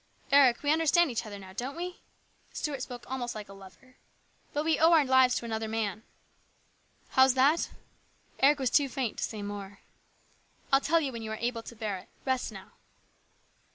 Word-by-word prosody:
" - - -36
Eric, 275 -3 +5
we 290 - +2
understand 325 0 +3
each 230 -1 -3
other 205 -1 -7
now, 190 -1 -11
don't 255 +7 -4
we? 355 +1 -6 0.2
" - - -36
Stuart 285 -4 -3
spoke 245 -2 -7
almost 245 -2 -4
like 210 -2 -7
a - - -10
lover. 195 +7 -16 0.3
" - - -38
But 295 +1 -2
we 320 -1 +2
owe 330 +2 +6
our 310 -3 +5
lives 260 -1 +4
to - - -3
another 220 -1 -3
man." 220 -2 -2 0.6
" - - -37
How's 260 0 +5
that? 280 +5 +3 0.4
" - - -35
Eric 285 +2 +5
was 260 -3 -1
too 285 -2 +3
faint 255 -4 -3
to - - -2
say 215 -2 -4
more. 200 -1 -7 0.4
" - - -27
I'll 270 - +6
tell 330 +3 +2
you 280 -3 -2
when 230 -2 -7
you 220 - -6
are 220 - -4
able 235 0 -2
to 235 - -11
bear 215 -4 -3
it. - - -17 0.2
Rest 260 -2 -1
now." - - -11
255 Hz, 215 wpm, -29 LUFS, 220-280 Hz, 0.6 s, owe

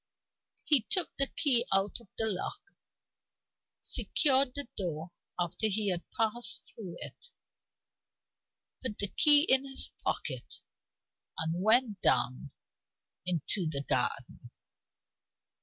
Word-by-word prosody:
He 295 -5 +3
took 370 -4 +1
the 275 - +3
key 255 -5 +3
out 195 +3 +1
of 235 - -19
the 225 - +1
lock; 305 - -5 1.1
secured 270 -3 +3
the 285 -3 -4
door 170 -3 -5 0.3
after 175 +5 0
he 210 0 0
had 175 -1 -4
passed 235 +1 -2
through 190 -6 -9
it; - - -10 1.5
put 245 -5 -5
the 200 - -2
key 295 +3 +6
in 265 -4 +3
his 270 -1 -5
pocket, - - -4 0.8
and 160 +2 -3
went 220 -1 +2
down 125 +3 +1 0.8
into 175 +1 0
the 140 -2 -4
garden. 125 -2 -2
215 Hz, 110 wpm, -30 LUFS, 175-260 Hz, 1.5 s, key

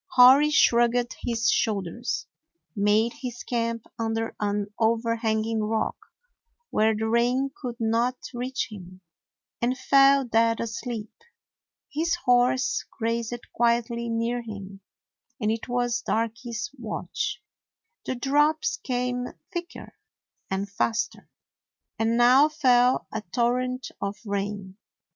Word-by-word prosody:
Hori 265 +3 +8
shrugged 240 -3 +3
his 235 0 -1
shoulders, 215 +2 -1 0.5
made 210 +3 +2
his 245 -2 -5
camp 230 -1 -2
under 225 0 -2
an 205 0 -2
overhanging 225 -1 +1
rock, 220 0 -1 0.8
where 220 +1 +3
the 220 +1 -1
rain 245 +4 +2
could 245 -4 -4
not 230 +3 +1 0.2
reach 250 +2 -3
him, 185 -2 -11 0.6
and 250 +2 +1
fell 275 0 +5
dead 230 -1 +2
asleep. 230 -1 -5 0.8
His 330 +3 +1
horse 250 +1 +3
grazed 230 +1 -2
quietly 235 0 +1
near 230 +1 -1
him, 200 -3 -9 0.6
and 215 -2 +1
it 225 0 -3
was 245 0 0
Darky's 230 +2 -2
watch. 225 -3 -3 0.6
The 260 - -3
drops 295 +5 +2
came 250 -1 -2 0.3
thicker 345 -1 -6 0.6
and 190 +1 -2
faster, 225 +3 -2 0.7
and 225 +1 +2
now 255 +5 +6
fell 255 -4 +3
a 220 - -2
torrent 250 +1 0
of 200 +1 -3
rain. 200 -1 -4
235 Hz, 110 wpm, -26 LUFS, 220-250 Hz, 0.8 s, Hori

